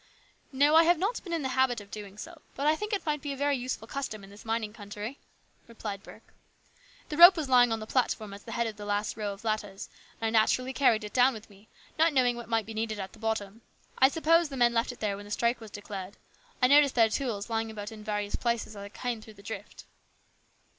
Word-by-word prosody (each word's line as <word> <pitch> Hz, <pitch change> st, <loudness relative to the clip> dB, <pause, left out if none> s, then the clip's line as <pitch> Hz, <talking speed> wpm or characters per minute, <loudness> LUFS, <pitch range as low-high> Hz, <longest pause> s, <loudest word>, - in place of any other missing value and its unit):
" -, -, -38 dB
No, 285 Hz, +2 st, +3 dB
I 325 Hz, +1 st, +8 dB
have 345 Hz, +1 st, +4 dB
not 400 Hz, +8 st, -1 dB
been 350 Hz, -, -8 dB
in 330 Hz, -3 st, -1 dB
the 265 Hz, -, -1 dB
habit 260 Hz, -2 st, +2 dB
of 205 Hz, -1 st, -14 dB
doing 205 Hz, -2 st, -8 dB
so, 325 Hz, +6 st, -9 dB
but 280 Hz, -, -3 dB
I 305 Hz, +1 st, +4 dB
think 420 Hz, +6 st, -5 dB
it 405 Hz, -3 st, -1 dB
might 300 Hz, -2 st, -1 dB
be 285 Hz, -1 st, -3 dB
a -, -, -8 dB
very 285 Hz, +1 st, +1 dB
useful 250 Hz, -3 st, -4 dB
custom 230 Hz, -6 st, -5 dB
in 195 Hz, -, -13 dB
this 205 Hz, -, -13 dB
mining 225 Hz, -2 st, -2 dB
country," 210 Hz, +4 st, -7 dB, 0.5 s
replied 210 Hz, -4 st, -6 dB
Burke. -, -, -15 dB, 0.3 s
" -, -, -28 dB
The 300 Hz, -, -4 dB
rope 350 Hz, +2 st, +10 dB
was 310 Hz, -3 st, -2 dB
lying 245 Hz, -2 st, +5 dB
on 225 Hz, -, 0 dB
the 215 Hz, -, -6 dB
platform 220 Hz, -4 st, -1 dB
at 200 Hz, +2 st, -12 dB
the 230 Hz, -, -5 dB
head 235 Hz, -, 0 dB
of 220 Hz, -2 st, -5 dB
the 205 Hz, -, -7 dB
last 205 Hz, +1 st, -1 dB
row 210 Hz, -1 st, -3 dB
of 200 Hz, +2 st, -10 dB
ladders, 210 Hz, -3 st, -3 dB, 0.3 s
and 225 Hz, 0 st, -1 dB
I -, -, +8 dB
naturally 255 Hz, +4 st, +1 dB
carried 240 Hz, -6 st, +3 dB
it 210 Hz, -, -7 dB
down 255 Hz, 0 st, +4 dB
with 215 Hz, 0 st, -11 dB
me, 200 Hz, +2 st, -19 dB, 0.3 s
not 325 Hz, 0 st, +4 dB
knowing 250 Hz, -3 st, +3 dB
what 240 Hz, -1 st, -8 dB
might 225 Hz, -2 st, +1 dB
be 225 Hz, -, -8 dB
needed 220 Hz, -1 st, -3 dB
at 190 Hz, -1 st, -6 dB
the -, -, -16 dB
bottom. 220 Hz, -1 st, -3 dB, 0.4 s
I 265 Hz, -, +7 dB
suppose 330 Hz, +2 st, +3 dB
the 270 Hz, -, -6 dB
men 240 Hz, -1 st, +4 dB
left 230 Hz, +2 st, +1 dB
it 245 Hz, -, -14 dB
there 205 Hz, -2 st, 0 dB
when 205 Hz, +1 st, -9 dB
the 205 Hz, -, -12 dB
strike 235 Hz, +3 st, +1 dB
was 220 Hz, -, -9 dB
declared. 200 Hz, -2 st, -8 dB, 0.5 s
I -, -, +9 dB
noticed 285 Hz, 0 st, +5 dB
their 230 Hz, -2 st, +6 dB
tools 230 Hz, -3 st, -3 dB
lying 225 Hz, 0 st, -1 dB
about 210 Hz, -1 st, -7 dB
in 215 Hz, -1 st, -10 dB
various 210 Hz, -1 st, -2 dB
places 235 Hz, -2 st, -1 dB
as -, -, -10 dB
I 200 Hz, 0 st, -7 dB
came 240 Hz, +1 st, -4 dB
through 215 Hz, 0 st, -13 dB
the 200 Hz, -, -16 dB
drift." 220 Hz, -, -8 dB
225 Hz, 255 wpm, -29 LUFS, 210-270 Hz, 0.5 s, rope